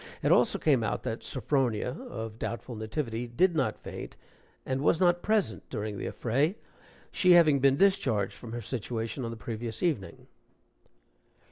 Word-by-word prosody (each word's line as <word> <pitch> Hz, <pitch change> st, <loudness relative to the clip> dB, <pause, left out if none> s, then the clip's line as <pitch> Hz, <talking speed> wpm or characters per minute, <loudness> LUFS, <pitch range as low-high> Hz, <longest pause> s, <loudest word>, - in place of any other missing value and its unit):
It -, -, +3 dB
also -, -, +4 dB
came 135 Hz, -7 st, +2 dB
out -, -, -2 dB
that 110 Hz, -, -3 dB
Sophronia, 130 Hz, -4 st, 0 dB, 0.2 s
of 110 Hz, -1 st, -6 dB
doubtful 115 Hz, +3 st, -4 dB
nativity, 115 Hz, +1 st, -3 dB
did 175 Hz, +10 st, +2 dB
not -, -, 0 dB
faint, -, -, -8 dB, 0.5 s
and 130 Hz, 0 st, -1 dB
was 155 Hz, +3 st, +3 dB
not 175 Hz, -1 st, +3 dB
present 215 Hz, -, 0 dB
during 105 Hz, -1 st, -4 dB
the -, -, -3 dB
affray, 140 Hz, -, 0 dB, 0.6 s
she 180 Hz, -1 st, +5 dB
having 155 Hz, -5 st, +6 dB
been 135 Hz, 0 st, +4 dB
discharged 130 Hz, -, +2 dB
from 115 Hz, -, -10 dB
her 120 Hz, +1 st, -4 dB
situation 115 Hz, +2 st, -3 dB
on 115 Hz, -, -3 dB
the 115 Hz, -, -6 dB
previous 115 Hz, +2 st, -5 dB
evening.) 145 Hz, -, -2 dB
120 Hz, 155 wpm, -29 LUFS, 110-150 Hz, 0.6 s, having